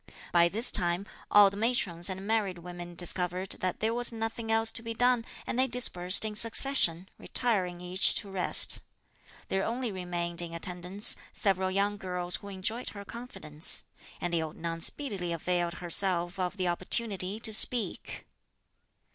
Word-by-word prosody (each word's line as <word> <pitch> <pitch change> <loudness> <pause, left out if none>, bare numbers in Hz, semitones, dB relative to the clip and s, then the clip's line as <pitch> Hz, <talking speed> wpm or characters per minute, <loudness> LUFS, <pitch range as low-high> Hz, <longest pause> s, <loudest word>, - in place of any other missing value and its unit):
By 170 0 +4
this 225 +7 +2
time, 175 +2 0 0.2
all 205 -1 +7
the 200 - -8
matrons 200 -6 0
and 190 +1 -6
married 205 -4 0
women 175 0 -9
discovered 180 +1 0
that 185 -1 -3
there 220 +1 +1
was 240 +1 +1
nothing 225 0 -4
else 225 0 +3
to - - -1
be 230 0 -5
done, 245 0 +2 0.2
and 245 - -3
they 260 - +3
dispersed 205 -6 +1
in 215 - -3
succession, 220 -6 +4
retiring 185 -8 -1
each 180 +2 +2
to 200 -3 -1
rest. 185 -2 +6 0.7
There 195 0 0
only 240 0 -3
remained 175 -2 -4
in 170 -1 -6
attendance 180 +4 -3 0.2
several 190 -3 0
young 200 +2 0
girls 180 -2 -1
who 200 - -12
enjoyed 200 +5 -4
her 200 -1 -10
confidence, 190 -11 -5 0.4
and 175 0 -3
the 165 - +1
old 155 -1 -6
nun 165 0 -5
speedily 195 - -2
availed 175 +1 -1
herself 175 0 +1
of 185 +2 -2
the 185 -1 -1
opportunity 195 +2 -1
to 220 -1 0
speak. 230 +1 +3
190 Hz, 160 wpm, -29 LUFS, 175-225 Hz, 0.7 s, all